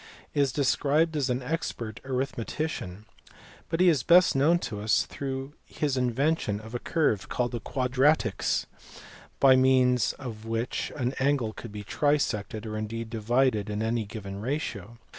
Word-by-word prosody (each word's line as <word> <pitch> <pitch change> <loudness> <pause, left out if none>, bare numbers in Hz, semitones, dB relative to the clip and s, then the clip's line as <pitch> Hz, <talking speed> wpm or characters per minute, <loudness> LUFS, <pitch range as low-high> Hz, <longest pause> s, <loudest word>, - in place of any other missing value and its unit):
is 140 -2 +2
described 150 +4 +2
as 140 -3 0
an 125 +1 -1
expert 125 -7 -4
arithmetician; 130 - -3 0.6
but 165 - -1
he 185 - +5
is 155 -7 +4
best 175 +4 +5
known 150 +6 +4
to 105 -11 -5
us 105 +1 +2
through 135 0 -5
his 145 -3 -2
invention 125 -3 0
of 110 +2 -11
a 120 - -2
curve 140 - 0
called 120 -1 -1
the 120 - -3
quadratrix, 130 -2 +1 0.7
by 135 -1 +7
means 130 -2 +3
of 110 -5 -8
which 115 +1 -2
an 125 -2 -1
angle 135 -5 +1
could 115 - -9
be 105 0 -7
trisected, 110 -5 0
or 110 -1 -5
indeed 110 +1 -5
divided 115 -1 +1
in 105 +1 -2
any 115 0 0
given 100 -1 -7
ratio. 115 - -4
125 Hz, 150 wpm, -27 LUFS, 110-140 Hz, 0.7 s, by